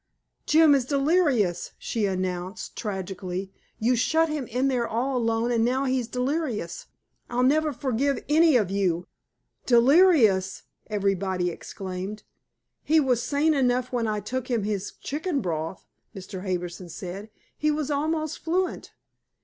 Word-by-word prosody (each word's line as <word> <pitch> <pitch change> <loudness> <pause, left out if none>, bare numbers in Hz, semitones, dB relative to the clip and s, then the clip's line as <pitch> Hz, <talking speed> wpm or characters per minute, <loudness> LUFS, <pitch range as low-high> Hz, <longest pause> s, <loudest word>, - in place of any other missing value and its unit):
"Jim 315 -1 +6
is 270 -3 +2
delirious!" 275 - +1
she 220 -3 -1
announced 185 0 -4
tragically. 190 -2 -4 0.2
"You 245 +3 +2
shut 320 +7 +2
him 300 -4 -3
in 250 +3 0
there 245 -3 0
all 255 +4 -1
alone 230 0 +1
and 230 -1 +2
now 260 +3 +1
he's 255 -3 0
delirious. 250 - -2 0.4
I'll 245 +1 0
never 305 +4 +3
forgive 270 0 -1
any 315 0 +5
of 205 -5 0
you." 180 -3 0 0.6
"Delirious!" 240 - +5 0.2
everybody 195 -3 0
exclaimed. 190 +4 -6 0.6
"He 315 +1 +4
was 255 -5 +2
sane 290 +5 +2
enough 255 -2 +1
when 240 -3 0
I 210 -1 -1
took 255 +5 -4
him 235 -4 0
his 205 -1 -2
chicken 305 +1 -3
broth," 165 -4 -4 0.3
Mr. 190 0 -7
Harbison 180 -1 -4
said. 190 +5 -7 0.3
"He 305 - 0
was 300 -1 -1
almost 310 +1 -1
fluent." 360 +3 -2
240 Hz, 135 wpm, -26 LUFS, 195-285 Hz, 0.6 s, Jim